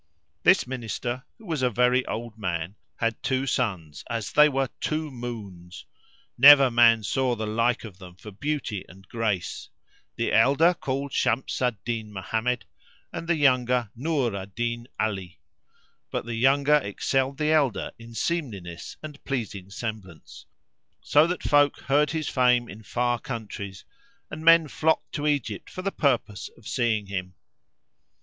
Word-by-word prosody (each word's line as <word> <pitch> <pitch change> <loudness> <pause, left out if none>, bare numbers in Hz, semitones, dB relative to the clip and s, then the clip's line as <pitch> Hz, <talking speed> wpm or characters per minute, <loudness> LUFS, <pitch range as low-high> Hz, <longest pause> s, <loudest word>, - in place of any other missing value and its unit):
This - - +5
Minister, 125 0 -4
who 225 - -16
was 160 -7 -2
a 125 - +3
very 125 +2 +3
old 115 0 -5
man, 90 -3 -3 0.2
had 115 -1 -2
two 130 0 0
sons, 95 - -2
as 115 -3 -3
they 150 0 +6
were 135 -2 -1
two 155 -1 -2
moons; 100 -8 -8 0.5
never 140 -1 +9
man 115 -2 +5
saw 130 +3 0
the 110 -1 -4
like 115 +3 0
of 105 -5 -10
them 90 -2 -12
for 105 +3 -11
beauty 125 -3 -3
and 95 +2 -16
grace, 105 -6 -2 0.5
the - - -1
elder 140 +10 +5
called 140 -3 -4
Shams 125 +3 0
al 125 -1 +2
Din 110 -3 -3
Mohammed 110 +5 -2 0.5
and 165 - -5
the 170 - +2
younger 125 -5 +2
Nur 135 -4 -1
al 95 -1 -5
Din 120 +3 -3
Ali; 95 -5 -3 0.7
but - - -3
the 120 - -5
younger 140 +5 +4
excelled 135 +3 -1
the 155 +1 +1
elder 145 -7 +1
in 115 0 -12
seemliness 105 - -4
and 150 -2 -9
pleasing 105 -8 -4
semblance, 100 -6 -8 0.6
so 150 +2 +4
that 180 +1 -3
folk 145 -1 +3
heard 145 +2 +2
his 160 -1 -2
fame 125 -2 +3
in 110 +1 -10
far 120 +2 -1
countries 105 -6 -7 0.5
and 155 +1 -7
men 165 -1 +7
flocked 160 +2 0
to 150 0 -2
Egypt 120 -8 -2
for 185 - -7
the 195 - -1
purpose 120 - 0
of 115 - -14
seeing 115 -4 0
him. 90 -2 -5
120 Hz, 155 wpm, -26 LUFS, 105-140 Hz, 0.7 s, never